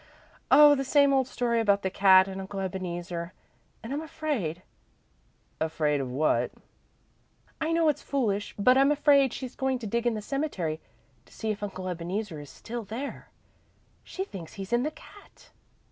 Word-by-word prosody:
"Oh, 295 +2 +8
the 275 -1 0
same 280 +1 +4
old 265 -2 +2
story 240 -2 0
about 200 -2 +2
the 190 - -1
cat 190 -1 +6
and 195 0 -5
Uncle 195 +1 -6
Ebeneezer. 175 -2 -4 0.5
And 230 +4 -5
I'm 290 - -2
afraid 260 - -3 0.5
" - - -40
"Afraid 150 -3 +1
of 130 - -4
what?" 145 +5 +1 1.1
"I 315 +1 0
know 330 -1 +3
it's 300 - +1
foolish, 210 -7 -1
but 250 +6 +5
I'm 275 +2 +5
afraid 285 -3 +4
she's 255 0 -7
going 265 -1 0
to 240 - -8
dig 235 +3 -1
in 235 - +1
the 215 - -4
cemetery 195 - -2 0.5
to - - -22
see 220 - -2
if 210 - -5
Uncle 190 -2 -5
Ebeneezer 180 0 -4
is 145 -1 -10
still 235 0 -7
there. 230 +7 -6 0.7
She 380 - -5
thinks 175 - -9
he's 195 +3 -6
in 240 - +3
the 295 - 0
cat." 310 +6 -17
220 Hz, 175 wpm, -28 LUFS, 185-275 Hz, 1.1 s, Oh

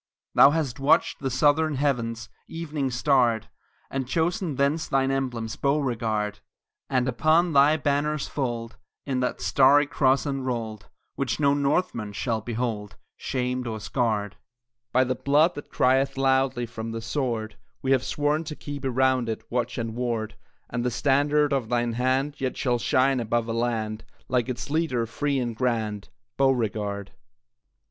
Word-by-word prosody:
Thou - - +8
hast 145 -4 -1
watched 135 +2 +3
the 135 - -2
southern 145 +4 +2
heavens 120 -5 -1 0.2
Evening 155 -4 -3
starred, 120 -3 +2 0.4
And 135 -2 -2
chosen 170 +2 0
thence 140 +4 +1
thine 135 0 +1
emblems, 120 -5 -2
Beauregard; 115 -7 0 0.5
And 130 -1 +1
upon 155 +7 +2
thy 145 +3 +5
banner's 145 +1 0
fold 120 -4 -3 0.3
Is 130 -2 -1
that 125 0 -2
starry 140 +2 +5
cross 135 -1 +2
enrolled, 120 -7 -3 0.2
Which - - -2
no 140 -1 +4
Northman 140 - 0
shall 110 +1 -1
behold 110 -3 -3 0.2
Shamed 125 -1 -2
or 110 -1 -4
scarred. 105 -2 -1 0.5
By 130 +1 +4
the 130 0 0
blood 145 +7 +3
that 145 - -9
crieth 135 +1 +2
loudly 135 -2 +2
From 115 -1 -6
the 115 - -4
sword, 115 -3 -2 0.3
We 135 - 0
have 130 -2 +3
sworn 150 +3 0
to 155 0 -5
keep 145 -1 -7
around 130 -2 +2
it 110 - -4
Watch 125 0 -1
and 115 -2 -3
ward, 115 -2 -2 0.3
And 120 - -3
the 125 - +1
standard 145 +3 +2
of 130 -5 -1
thine 120 -1 0
hand 130 +4 0
Yet 130 -1 -2
shall 125 -3 +1
shine 130 +2 +2
above 115 0 -1
a 115 - -2
land, 115 -2 -2 0.2
Like 125 0 0
its 125 +3 -4
leader, 150 -7 0
free 140 +5 -1
and 120 -3 -2
grand, 110 -4 -2 0.3
Beauregard! 105 -7 0
MRS. - - -35
130 Hz, 155 wpm, -25 LUFS, 115-140 Hz, 0.5 s, Thou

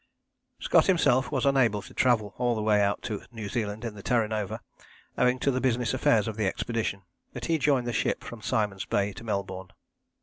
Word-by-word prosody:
Scott - - +3
himself 145 -9 +3
was 135 -3 0
unable 120 -7 +3
to - - -13
travel 110 -5 +2
all 120 -1 +1
the 110 - -2
way 105 -1 +3
out 100 0 0
to 105 -3 -4
New 110 -3 -6
Zealand 110 0 -3
in 115 - -4
the 105 - -10
Terra 115 0 +1
Nova 105 -3 -3 0.6
owing 125 0 +2
to 140 - +1
the 130 0 -1
business 125 -2 +1
affairs 115 -4 +3
of 110 -1 -4
the 105 -3 +1
expedition, 110 -2 -2 0.3
but - - -5
he 165 -1 +1
joined 135 -4 +2
the 120 - -2
ship - - 0
from 120 -2 -9
Simon's 105 -5 -1
Bay 100 0 0
to - - -10
Melbourne. 95 -4 -4
115 Hz, 205 wpm, -27 LUFS, 105-125 Hz, 0.6 s, Scott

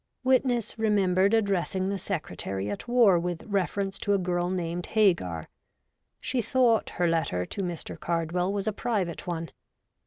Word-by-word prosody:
' - - -53
Witness 255 -3 +1
remembered 200 -3 +3
addressing 195 -3 0
the 200 -1 -2
Secretary 100 - -3
at 100 - -6
War 235 -7 +5
with 175 -1 -3
refer 200 -1 -1
ence 195 0 -4
to 205 -1 +1
a - - +3
girl 175 -1 -1
named 175 -1 -3
Hagar. 170 - +1 0.7
She 255 -2 -1
thought 240 -2 +2
her 175 -1 +2
letter 160 - 0
to 200 - -5
Mr. 175 -3 -5
Cardwell 170 +2 -1
was 200 -1 -2
a 215 - 0
private 195 -8 -2
one. 165 -1 -3
185 Hz, 160 wpm, -27 LUFS, 170-210 Hz, 0.7 s, War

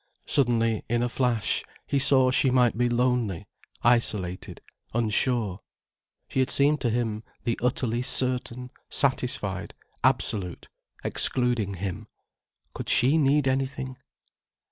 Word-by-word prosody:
Suddenly, 115 -4 +2
in 120 +1 +1
a 120 - 0
flash, 120 -3 0 0.2
he 140 - 0
saw 130 -1 +4
she 135 +1 +3
might 125 -2 +3
be 120 +1 +1
lonely, 120 -6 0 0.4
isolated, 105 -6 0 0.4
unsure. 110 -3 0 0.7
She - - -3
had 130 - +1
seemed 145 +2 +3
to 120 - 0
him 110 -2 -2 0.2
the 115 -2 -2
utterly 120 -1 -1
certain, 125 -1 0 0.2
satisfied, 125 -8 -1 0.3
absolute, 90 -5 0 0.3
excluding 120 -6 0
him. 100 +3 -5 0.7
Could - - -6
she 130 +5 +4
need 140 -1 +2
anything? 130 0 -2
120 Hz, 115 wpm, -26 LUFS, 110-130 Hz, 0.7 s, saw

